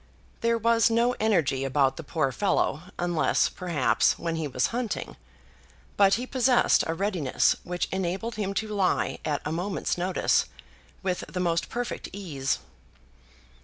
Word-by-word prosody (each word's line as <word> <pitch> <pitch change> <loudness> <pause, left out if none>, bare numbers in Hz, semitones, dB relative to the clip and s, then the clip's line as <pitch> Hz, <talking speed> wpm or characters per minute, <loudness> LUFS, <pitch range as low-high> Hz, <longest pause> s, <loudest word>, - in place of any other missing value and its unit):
There 230 0 +2
was 230 +1 +3
no 235 +2 +2
energy 170 -11 +2
about 135 0 +2
the - - -6
poor 150 -2 0
fellow, 175 -4 0 0.2
unless, 175 -2 +1
perhaps, 170 -8 +1
when 165 -1 -3
he 160 -2 -2
was 125 -2 0
hunting; 240 -2 -3 0.8
but 200 -1 +5
he 245 - -3
possessed 255 -1 +3
a 165 - -1
readiness 185 -8 +1
which 180 0 -2
enabled 190 +5 -2
him 200 -2 -3
to 220 - -1
lie 195 -3 +1
at 150 -2 -2
a 150 - -2
moment's 180 +2 -2
notice 185 +1 +2 0.6
with 185 -1 -1
the 180 - -5
most 170 -2 0
perfect 240 +1 -4
ease. 150 -9 -2
180 Hz, 145 wpm, -27 LUFS, 160-220 Hz, 0.8 s, but